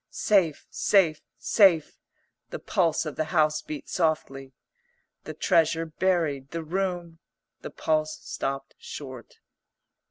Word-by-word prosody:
"Safe, 185 -8 +1
safe, 170 -7 +3 0.2
safe," 185 -8 +3 0.5
the - - -5
pulse 170 -5 0
of 155 - -6
the 155 - 0
house 155 -2 +2
beat 150 -3 -7
softly. 135 -5 -1 0.7
"The - - -7
treasure 165 0 +2
buried; 160 -5 0
the 165 +1 -5
room 175 -1 -3 0.2
..." - - -56
the - - -6
pulse 155 -1 -1
stopped 135 0 -4
short. 130 -5 -9
160 Hz, 120 wpm, -26 LUFS, 150-175 Hz, 0.7 s, safe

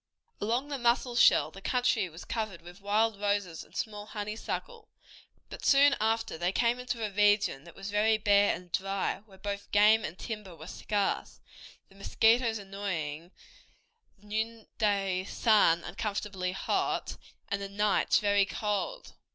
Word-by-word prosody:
Along 235 +6 0
the 280 -2 -3
Musselshell 240 0 +4
the 195 - -12
country 245 -5 +1
was 165 +1 -11
covered 215 -7 -4
with 175 +3 -13
wild 210 +1 +1
roses 200 -5 -1
and - - -21
small 210 -1 -4
honeysuckle, 220 - -5 0.6
but - - -10
soon 280 0 +5
after 225 -6 0
they 175 +1 +1
came 235 +4 +1
into 245 -3 -3
a 210 - -4
region 205 -7 +2
that 170 - -14
was 195 +1 -7
very 215 +1 +3
bare 205 -1 +4
and 180 -1 -12
dry, 195 +1 -1
where 190 -2 -17
both 200 +1 -5
game 215 +2 +5
and 165 -1 -5
timber 210 -6 -7
were 160 0 -11
scarce, 205 +3 -2 0.5
the - - -22
mosquitoes 225 +3 +2
annoying, 180 -6 -5 0.9
the 205 - -23
noonday 210 -3 -1
sun 200 -7 +3
uncomfortably 200 -3 -3
hot, 195 - -1 0.3
and 200 0 -2
the 200 - -5
nights 205 0 +2
very 205 -1 +3
cold. 210 - -3
205 Hz, 145 wpm, -30 LUFS, 195-225 Hz, 0.9 s, soon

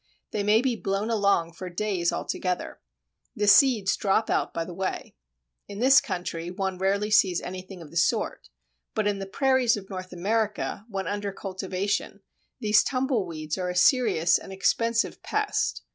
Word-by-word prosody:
They 210 - -1
may 210 +2 +4
be 255 -3 +1
blown 200 +1 -2
along 200 -6 +2
for 180 +2 -7
days 180 -2 -1 0.2
together. 180 -1 -3 0.6
The 210 - 0
seeds 205 -1 +5
drop 210 +2 +1
out - - 0
by 165 - -3
the 180 - -8
way. 190 +2 -4 0.5
In 200 - -8
this 265 +4 +6
country 175 -3 -4
one 190 0 -3
rarely 200 +2 0
sees 190 -4 +4
anything 185 -1 -8
of 150 - -14
the 170 - -6
sort, 170 - 0 0.5
but 215 - 0
in 205 -1 0
the 195 - -5
Prairies 260 +1 +2
of 195 0 -10
North 185 -1 -6
America, 205 +3 -2
when 195 -2 -3
under 205 0 -3
cultivation, 195 +1 -3 0.4
these 210 -3 +4
tumble 255 -6 0
weeds 155 0 -5
are 180 -1 -2
a 180 - -4
serious 180 - +4
and - - -11
expensive 230 +5 0
pest. - - -1
195 Hz, 165 wpm, -26 LUFS, 180-215 Hz, 0.6 s, this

